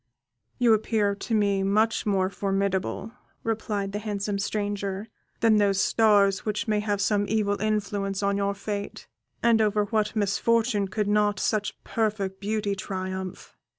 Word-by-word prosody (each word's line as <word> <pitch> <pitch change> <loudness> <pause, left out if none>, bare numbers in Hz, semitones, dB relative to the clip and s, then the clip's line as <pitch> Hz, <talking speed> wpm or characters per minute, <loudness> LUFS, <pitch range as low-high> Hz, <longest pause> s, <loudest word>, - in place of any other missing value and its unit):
"You 235 -2 +5
appear 215 -1 +1
to 220 +3 -3
me 200 -2 +2
much 215 +3 +1
more 190 -2 +1
formidable," 195 +2 -1 0.3
replied 210 -3 -2
the 205 - -3
handsome 205 -1 -3
stranger, 205 0 -3 0.3
"than 225 -2 +5
those 200 -2 +3
stars 205 -2 +3
which 210 0 -2
may 210 -1 +2
have 205 -1 -1
some 205 0 +1
evil 205 -2 0
influence 205 -2 -1
on 200 0 +2
your 200 0 0
fate, 205 0 -5 0.4
and 230 -1 +4
over 210 -1 +2
what 215 0 -1
misfortune 215 +1 +1
could 205 +2 -2
not 210 0 +2
such 210 -1 -1
perfect 205 -4 -1
beauty 210 0 -1
triumph! 190 -1 -5
205 Hz, 145 wpm, -26 LUFS, 200-215 Hz, 0.4 s, You